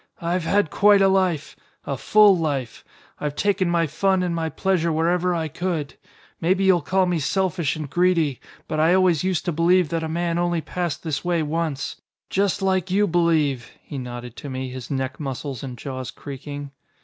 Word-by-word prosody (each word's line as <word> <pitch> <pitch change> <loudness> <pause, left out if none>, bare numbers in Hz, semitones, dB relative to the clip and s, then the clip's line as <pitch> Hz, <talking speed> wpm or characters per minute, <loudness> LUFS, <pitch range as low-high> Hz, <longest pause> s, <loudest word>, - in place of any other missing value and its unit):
"I've 170 0 -1
had 200 -4 +2
quite 205 0 +5
a - - +6
life. 185 -5 +1 0.3
A 140 - -2
full 210 +8 +5
life. 140 -8 -3 0.4
I've 150 -1 -3
taken 195 -1 +1
my 170 -1 +2
fun 190 +5 +1
and 175 -1 -1
my 165 -1 -1
pleasure 175 -2 0
wherever 175 +3 +1
I 160 -1 -1
could. 165 -2 -3 0.5
Maybe 185 +3 +2
you'll 190 -3 +4
call 185 +5 +2
me 175 -2 0
selfish 170 +1 0
and 155 -2 -5
greedy, 170 -4 +1 0.3
but 155 - -2
I 165 +3 +4
always 185 -4 +3
used 185 -3 0
to 175 - 0
believe 170 +1 +3
that 165 +1 -1
a 160 - -3
man 170 +1 -1
only 175 -1 +1
passed 170 0 -3
this 155 -4 -2
way 175 -2 +1
once. 155 -2 -3 0.3
Just 195 -1 +1
like 190 -1 +1
you 200 +3 +3
believe," 160 - +1
he 140 - -7
nodded 120 -1 -7
to 145 - -7
me, 130 -1 -4
his 125 -2 -8
neck 130 -1 -3
muscles 135 -2 -5
and 125 -2 -7
jaws 130 +1 -5
creaking. 145 0 -8
165 Hz, 185 wpm, -23 LUFS, 145-185 Hz, 0.5 s, a